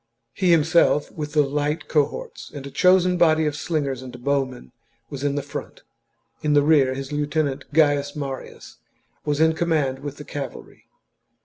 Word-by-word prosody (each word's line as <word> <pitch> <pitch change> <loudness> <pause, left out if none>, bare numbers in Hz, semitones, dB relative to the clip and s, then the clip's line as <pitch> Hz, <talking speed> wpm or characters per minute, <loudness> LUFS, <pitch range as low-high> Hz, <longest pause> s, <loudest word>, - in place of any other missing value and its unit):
He 185 -2 0
himself, 160 -2 +3
with 150 -2 -6
the 150 -1 +4
light 150 +2 -2
cohorts, 150 -3 -2
and 140 -2 -8
a 140 - -8
chosen 180 +1 +4
body 160 -2 +4
of 150 -1 -1
slingers 145 -5 -2
and 125 -1 -10
bowmen, 135 - -1 0.4
was 140 -1 -6
in 145 -1 0
the 145 - -2
front. 140 - -8 0.6
In 150 -1 +1
the 145 -1 +5
rear 140 -4 +4
his 135 +1 -6
lieutenant, 145 -2 -2
Gaius 145 -2 +2
Marius, 135 -3 -7 0.5
was 145 -1 0
in 160 0 +4
command 155 -6 0
with 145 0 -7
the 150 - -9
cavalry. 140 -4 -8
145 Hz, 165 wpm, -23 LUFS, 140-155 Hz, 0.6 s, the